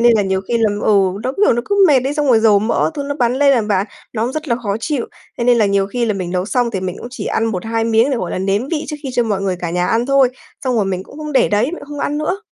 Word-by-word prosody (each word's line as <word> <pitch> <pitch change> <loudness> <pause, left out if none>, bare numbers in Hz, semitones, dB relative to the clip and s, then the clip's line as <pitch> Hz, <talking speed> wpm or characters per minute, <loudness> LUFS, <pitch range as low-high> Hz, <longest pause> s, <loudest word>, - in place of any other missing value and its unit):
nên 240 0 +6
là 210 - +2
nhiều 190 -1 0
khi 235 -1 +1
làm 210 -2 +1
ừ, 195 -3 +3
nó 255 - -2
cứ, 410 - 0
kiểu, - - +5
nó 240 +1 -1
cứ 405 -1 +3
mệt 265 -4 +4
ấy, 280 +2 -1
xong 295 -1 0
rồi 235 -4 +4
dầu 215 -3 +5
mỡ 220 +8 0
các 285 - -3
thứ 285 - -1
bắn 240 0 +2
lên 280 +1 +4
nè 240 - +2
bạn, 205 -2 0 0.3
nó 225 -1 -1
cũng 250 - -2
rất 310 +1 -5
là 235 - +1
khó 210 -4 -2
chịu. 280 -2 -2 0.3
Thế 235 - -1
nên 245 -1 +4
là 215 - +4
nhiều 200 -1 +1
khi 240 +4 -2
là 215 -3 0
mình 180 -2 -4
nấu 180 0 -1
xong 240 +3 0
thì 195 -4 -3
mình 185 0 -4
cũng 240 - -8
chỉ 250 - -6
ăn - - 0
1-2 225 +2 -2
miếng 230 +4 +3
để, 265 - 0
gọi 185 -7 -3
là, - - -3
nếm 200 +7 -1
vị 320 -2 -2
trước 300 - -4
khi 270 - -4
cho 245 - +2
mọi 205 -4 -1
người 185 -2 -1
cả 170 - -3
nhà 180 +1 0
ăn 230 +2 +1
thôi, 275 -2 +4 0.4
xong 255 -2 0
rồi 210 - +2
mình 185 -1 -2
cũng 275 - -15
không 300 -1 -5
để 270 - +3
đấy, 210 +2 +2
mình 320 +7 -3
cũng 285 - -11
không 290 -1 -6
ăn 295 +1 -1
nữa! 365 +7 -2
230 Hz, 340 wpm, -17 LUFS, 200-270 Hz, 0.4 s, nên